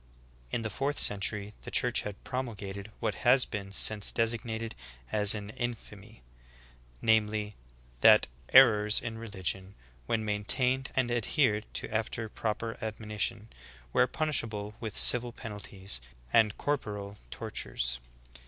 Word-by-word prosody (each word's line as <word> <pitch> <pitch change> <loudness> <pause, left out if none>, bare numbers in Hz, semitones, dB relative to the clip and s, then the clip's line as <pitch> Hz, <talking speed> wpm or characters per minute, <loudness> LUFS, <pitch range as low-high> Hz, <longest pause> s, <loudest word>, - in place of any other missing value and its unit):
12. - - -4
In - - -1
the 110 - -2
fourth 140 +9 -2
century 105 +1 +2
the - - -8
Church 125 -1 +4
had 105 -1 -8
promulgated 105 -5 -5
what - - -1
has 125 +1 +6
been 100 -2 -6
since 105 +1 +4
designated 115 -1 -1 0.4
as 105 0 +4
an 105 0 -6
infamy, 110 -2 -7 0.8
viz: 105 -1 +2 0.5
that - - +7 0.3
'*er 120 -5 +8
ors 105 0 +2
in 115 -1 -6
religion, 95 -3 -4 0.3
when 110 -1 0
maintained 125 +5 +1
and 125 -2 +1
adhered 115 -2 +1
to - - -2
after 110 +1 -2
prop 110 +1 -3
er 115 -1 -4
admonition, 110 0 -3 0.5
were 125 - +4
punishable 115 -9 -1
with 110 -3 -6
civil 120 0 +4
penalties, 100 - -5 0.3
and 110 -3 +4
corporeal 105 -8 -3
tortures." - - -2
110 Hz, 130 wpm, -30 LUFS, 105-120 Hz, 0.8 s, er